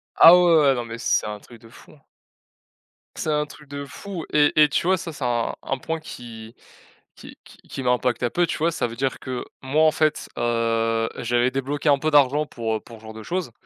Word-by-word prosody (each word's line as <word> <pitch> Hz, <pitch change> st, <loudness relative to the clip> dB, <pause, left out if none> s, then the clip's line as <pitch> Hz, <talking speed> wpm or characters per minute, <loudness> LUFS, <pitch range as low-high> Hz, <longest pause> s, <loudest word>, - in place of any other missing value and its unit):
Ah 165 Hz, -, +9 dB
ouais, 180 Hz, -, +5 dB
ouais, 170 Hz, -2 st, +5 dB
ouais -, -, +4 dB
non 120 Hz, -1 st, -4 dB
mais 115 Hz, 0 st, -7 dB
c -, -, +2 dB
c'est -, -, -8 dB
un 105 Hz, 0 st, -6 dB
truc 120 Hz, +1 st, -16 dB
de 115 Hz, -, -15 dB
fou! 145 Hz, -, -17 dB, 1.2 s
C'est 155 Hz, -, -2 dB
un 150 Hz, 0 st, +1 dB
truc 150 Hz, 0 st, -15 dB
de 140 Hz, 0 st, -6 dB
fou 180 Hz, +4 st, -8 dB
et 150 Hz, -1 st, +3 dB
et 150 Hz, -, +6 dB
tu 145 Hz, -, -1 dB
vois? 190 Hz, +1 st, +3 dB
Ça 165 Hz, -1 st, -6 dB
c'est 145 Hz, -, -8 dB
un 120 Hz, -1 st, -1 dB
un 135 Hz, -, -2 dB
point 165 Hz, +5 st, -4 dB
qui 115 Hz, -6 st, -10 dB, 0.6 s
qui -, -, -13 dB
qui -, -, -17 dB
qui 135 Hz, -, -6 dB
m'impacte 125 Hz, -1 st, 0 dB
un 120 Hz, -, +1 dB
peu, 175 Hz, -, +2 dB
tu -, -, -3 dB
vois? 165 Hz, +2 st, +1 dB
Ça 150 Hz, -, -2 dB
veut 115 Hz, -, -9 dB
dire 130 Hz, +2 st, -2 dB
que 130 Hz, -1 st, -5 dB, 0.2 s
moi 145 Hz, +4 st, +2 dB
en 155 Hz, -, +5 dB
fait, 155 Hz, 0 st, 0 dB
heu, 115 Hz, -1 st, 0 dB
j'avais 120 Hz, +1 st, +1 dB
débloqué 135 Hz, +3 st, -2 dB
un 140 Hz, -, +5 dB
peu 155 Hz, +2 st, -1 dB
d'argent 145 Hz, +1 st, +4 dB
pour, 115 Hz, -5 st, -3 dB
heu, -, -, -9 dB
pour 115 Hz, -2 st, -13 dB
ce -, -, -21 dB
genre 110 Hz, 0 st, -9 dB
de 110 Hz, 0 st, -10 dB
chose 175 Hz, -1 st, -3 dB
135 Hz, 240 wpm, -23 LUFS, 115-155 Hz, 1.2 s, Ah